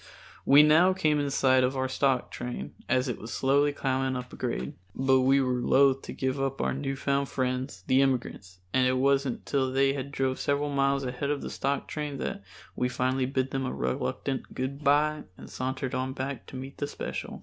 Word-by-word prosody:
We 145 +2 +8
now 165 +5 +5
came 155 -5 +1
in 145 -1 0
sight 130 -1 +3
of 130 +2 0
our 130 0 0
stock 130 -1 0
train 120 0 -6 0.2
as 130 +1 +2
it 125 - -3
was 115 - -8
slowly 140 +2 +2
climbing 130 -2 -1
a 125 - -3
grade, 95 - -3 0.2
but 130 0 +3
we 135 +2 +4
were 125 -2 0
loath 135 +1 +4
to - - -8
give 130 +1 -2
up 135 0 -2
our - - 0
new 135 0 -3
found 140 +1 0
friends, 130 -7 -2
the 130 +1 +4
immigrants, 120 -9 -1 0.2
and 130 -1 +4
it 130 0 +2
wasn't 135 -1 +1
till 130 -2 0
they 135 +1 +3
had 140 0 -5
drove 130 -1 -1
several 145 +1 0
miles 140 0 +1
ahead 130 +2 -3
of 145 -1 -1
the - - -5
stock 140 0 -2
train 150 -2 -4
that 100 - -4 0.3
we 125 - 0
finally 130 +1 0
bid 130 0 -1
them 135 -1 -1
a - - -2
reluctant 130 - -3
good 140 +3 -4
bye 150 +2 +2
and - - -11
sauntered 130 0 -3
on 130 0 -2
back 135 +1 -5
to - - -10
meet 135 +1 -8
the 145 - -1
special. - - -6
135 Hz, 205 wpm, -28 LUFS, 130-140 Hz, 0.3 s, We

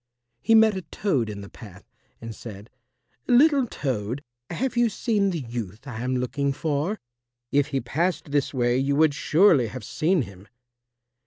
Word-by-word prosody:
He 225 - +4
met 220 -2 +6
a 190 - -3
Toad 145 - -1
in 100 -1 -6
the 100 - -9
path, 100 -5 -13 0.3
and 115 -1 -7
said, 105 -1 -10 0.6
"Little 275 +1 +5
Toad, 130 - -3 0.3
have 250 +9 -2
you 240 -1 +3
seen 210 -3 0
the 170 -5 -3
youth 115 -2 -6
I 120 -5 -6
am 130 +1 -1
looking 140 +3 -1
for? 155 +7 -2 0.5
If 140 0 +2
he 135 - -2
passed 160 +5 -2
this 145 -1 +1
way 120 -1 +1
you 140 +1 +1
would 155 0 +4
surely 155 - +4
have 130 +4 -8
seen 165 -1 +1
him." 95 -1 -13
140 Hz, 165 wpm, -25 LUFS, 120-185 Hz, 0.6 s, met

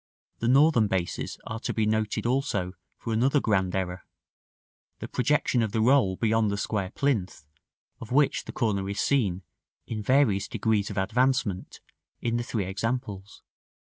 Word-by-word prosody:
The 115 - -1
Northern 135 -3 +5
bases 95 -3 -2
are 110 - -5
to - - -4
be 110 - +1
noted 110 0 0
also 120 -8 0 0.2
for 115 - -4
another 130 +6 +3
grand 95 -7 0
error: 90 -1 -3 0.9
the - - -7
projection 125 -2 +1
of 110 -2 -1
the 115 - +1
roll 120 -5 +4
beyond 110 0 +1
the 100 - -2
square 100 -2 -2
plinth, 100 - -1 0.5
of 115 - -10
which 140 +2 +2
the - - -6
corner 100 -5 -1
is 100 0 -3
seen, 100 -10 +1 0.4
in 110 -2 -4
various 105 -5 +2
degrees 105 -2 0
of - - -7
advancement, 110 -1 0 0.4
in 115 0 -1
the 120 - -1
three 110 -5 -2
examples. 105 0 -4
110 Hz, 155 wpm, -27 LUFS, 100-125 Hz, 0.9 s, Northern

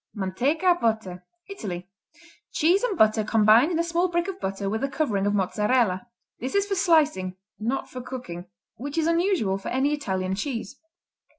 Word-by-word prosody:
Manteca, 265 - +1
Butter 215 -6 -1 0.2
Italy 190 - -6 0.6
Cheese 350 +6 +3
and 465 -7 -1
butter 215 0 +4
combined 220 +5 +5
in 330 - 0
a 335 - +2
small 340 +2 +1
brick 345 0 -1
of 385 -1 -5
butter 195 +1 -3
with 220 +5 -2
a 275 - 0
covering 245 -9 0
of 205 - +1
Mozzarella. 210 +1 +1 0.3
This 255 +7 -4
is 400 0 +3
for 405 - -2
slicing 310 - +2 0.2
not 235 +5 -2
for 255 - -7
cooking 240 -9 -7 0.3
which 285 +6 -6
is 320 - +2
unusual 335 - +1
for - - -8
any 270 +4 +1
Italian 190 -10 -2
cheese. 230 +3 -4
250 Hz, 170 wpm, -25 LUFS, 200-330 Hz, 0.6 s, combined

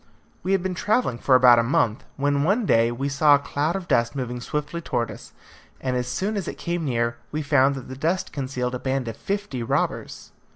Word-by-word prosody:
We 190 - 0
had 190 -2 +1
been 190 -1 -1
travelling 205 - 0
for 130 - +4
about 125 -2 +7
a - - +3
month, 115 -2 +1
when 140 0 +1
one 205 +8 +2
day 115 -7 +3
we 135 +4 -2
saw 145 +1 +5
a - - +4
cloud 145 +4 -2
of 190 -2 -4
dust 115 +3 +1
moving 125 -2 -4
swiftly 150 +5 -3
towards 120 -7 -2
us; - - -11 0.5
and 130 -1 -2
as 125 -1 -1
soon 195 +11 -2
as 200 - -3
it - - -5
came 170 -1 -2
near, 120 -3 0
we 155 +1 -2
found 140 -1 +3
that 130 - -8
the 130 - -7
dust 165 +7 -1
concealed 130 -3 -3
a 125 - -3
band 130 -1 -2
of 115 - -4
fifty 200 - -3
robbers. 115 - -2
140 Hz, 220 wpm, -24 LUFS, 125-170 Hz, 0.5 s, about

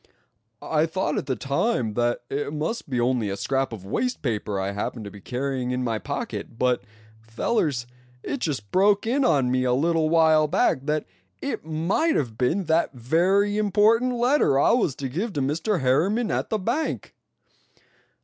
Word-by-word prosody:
"I 155 0 +1
thought 160 -2 -1
at - - -7
the 130 - 0
time 140 - 0
that 120 +2 0
it 145 +2 -3
must 155 +6 -3
be 125 -2 -1
only 120 -3 +1
a 100 - -3
scrap 135 +6 -1
of 105 -5 -8
waste 250 - -2
paper 105 -5 -2
I 95 +1 -2
happened 105 +2 -4
to 100 - -7
be 100 - -12
carrying 130 +2 -3
in 125 0 -1
my 115 -3 -1
pocket; 115 - -5
but 125 0 +1 0.4
fellers, 120 - -1 0.4
it 280 - -3
just 135 - -3
broke 200 +2 +3
in 265 +5 +1
on 135 - +2
me 130 0 +1
a 125 -1 +2
little 160 +3 +2
while 160 -2 +4
back 140 -1 +1
that 150 0 0 0.3
it - - -4
might 170 - 0
have 120 -6 -1
been 130 - 0
that 165 -1 +1
very 185 - +2
important 220 +4 +3
letter 245 - +3
I - - +4
was 220 - +2
to 135 - -4
give 190 - -3
to 145 - -2
Mr. 160 +8 0
Harriman 185 - +2
at - - -1
the 220 - 0
bank!" 235 +11 -2
150 Hz, 180 wpm, -24 LUFS, 125-200 Hz, 0.4 s, while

